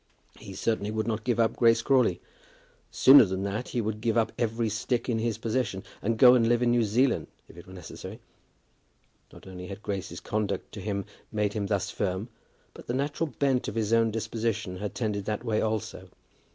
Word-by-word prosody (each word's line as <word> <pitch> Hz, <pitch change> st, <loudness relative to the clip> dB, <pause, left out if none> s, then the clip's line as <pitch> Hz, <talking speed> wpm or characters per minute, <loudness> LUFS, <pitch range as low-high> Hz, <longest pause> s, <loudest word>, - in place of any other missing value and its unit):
He 95 Hz, -, -10 dB
certainly 105 Hz, -1 st, -1 dB
would 110 Hz, 0 st, -2 dB
not 110 Hz, -1 st, -2 dB
give 120 Hz, -1 st, 0 dB
up 115 Hz, -1 st, +2 dB
Grace 115 Hz, -1 st, +4 dB
Crawley. 135 Hz, -2 st, +3 dB, 0.7 s
Sooner 135 Hz, 0 st, +8 dB
than 95 Hz, -1 st, -2 dB
that, 100 Hz, +5 st, -3 dB
he 120 Hz, -, -2 dB
would 110 Hz, 0 st, -3 dB
give 115 Hz, 0 st, +1 dB
up 110 Hz, -2 st, +2 dB
every 115 Hz, 0 st, -1 dB
stick 110 Hz, +3 st, -2 dB
in 115 Hz, -3 st, 0 dB
his 115 Hz, -1 st, -1 dB
possession, 115 Hz, -4 st, -2 dB, 0.2 s
and 115 Hz, +2 st, 0 dB
go 125 Hz, +1 st, +8 dB
and 115 Hz, -2 st, +3 dB
live 120 Hz, 0 st, +3 dB
in 120 Hz, -, +3 dB
New 120 Hz, 0 st, +3 dB
Zealand 120 Hz, +5 st, +1 dB, 0.2 s
if -, -, -16 dB
it 85 Hz, +2 st, -13 dB
were 95 Hz, -, -12 dB
necessary. 90 Hz, -3 st, -9 dB, 1.1 s
Not -, -, -15 dB
only 90 Hz, -1 st, -8 dB
had 100 Hz, +2 st, -9 dB
Grace's 100 Hz, -3 st, -4 dB
conduct 105 Hz, -2 st, -3 dB
to 105 Hz, -, -8 dB
him 100 Hz, -1 st, -3 dB, 0.3 s
made 105 Hz, -2 st, 0 dB
him 105 Hz, -2 st, -2 dB
thus 100 Hz, -3 st, -1 dB
firm, 100 Hz, +3 st, -2 dB, 0.4 s
but -, -, -13 dB
the 120 Hz, -, -1 dB
natural 145 Hz, +4 st, -1 dB
bent 135 Hz, -1 st, 0 dB
of -, -, -5 dB
his 110 Hz, -1 st, 0 dB
own 115 Hz, 0 st, +4 dB
disposition 110 Hz, -3 st, -3 dB
had 105 Hz, +2 st, -5 dB
tended 105 Hz, -4 st, -2 dB
that 105 Hz, +1 st, -3 dB
way 110 Hz, -3 st, 0 dB
also. 110 Hz, -2 st, -3 dB
110 Hz, 200 wpm, -27 LUFS, 100-120 Hz, 1.1 s, Sooner